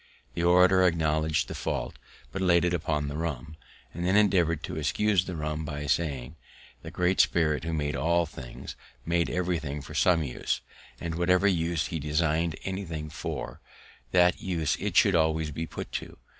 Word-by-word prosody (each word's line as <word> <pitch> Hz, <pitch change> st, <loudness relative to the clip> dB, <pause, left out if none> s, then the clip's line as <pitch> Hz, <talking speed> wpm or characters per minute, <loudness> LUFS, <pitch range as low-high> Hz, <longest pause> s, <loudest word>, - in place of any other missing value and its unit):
The -, -, -3 dB
orator 90 Hz, +2 st, +5 dB
acknowledg'd 80 Hz, -3 st, +2 dB
the -, -, -6 dB
fault, -, -, -3 dB, 0.3 s
but 95 Hz, -, -4 dB
laid 85 Hz, -2 st, +4 dB
it 90 Hz, -, +1 dB
upon 75 Hz, -3 st, -1 dB
the 70 Hz, +1 st, -4 dB
rum; 80 Hz, -2 st, -4 dB, 0.4 s
and 85 Hz, -, -5 dB
then 95 Hz, +2 st, +2 dB
endeavoured 90 Hz, -6 st, +3 dB
to -, -, -5 dB
excuse 95 Hz, +5 st, +2 dB
the 90 Hz, -, -5 dB
rum 75 Hz, 0 st, -3 dB
by 75 Hz, -1 st, -5 dB
saying, 70 Hz, -2 st, -1 dB, 0.5 s
"_The -, -, -7 dB
Great 90 Hz, +1 st, +1 dB
Spirit, 80 Hz, -2 st, +1 dB
who 85 Hz, -, -2 dB
made 75 Hz, -2 st, -1 dB
all 85 Hz, +5 st, +2 dB
things, 65 Hz, -6 st, -9 dB, 0.3 s
made 85 Hz, 0 st, +1 dB
everything 85 Hz, -5 st, -2 dB
for 75 Hz, +2 st, -10 dB
some 85 Hz, +1 st, +3 dB
use, 65 Hz, -4 st, -2 dB, 0.4 s
and 85 Hz, -1 st, -4 dB
whatever 90 Hz, +3 st, +3 dB
use 85 Hz, -2 st, +1 dB
he 80 Hz, -, -3 dB
design'd 80 Hz, +2 st, 0 dB
anything 85 Hz, -6 st, -4 dB
for, -, -, -5 dB, 0.5 s
that 90 Hz, -1 st, +3 dB
use 80 Hz, -6 st, 0 dB
it -, -, -1 dB
should 100 Hz, -, +6 dB
always 80 Hz, -2 st, +1 dB
be 80 Hz, +3 st, -4 dB
put -, -, -7 dB
to. -, -, -5 dB
80 Hz, 170 wpm, -28 LUFS, 75-90 Hz, 0.5 s, should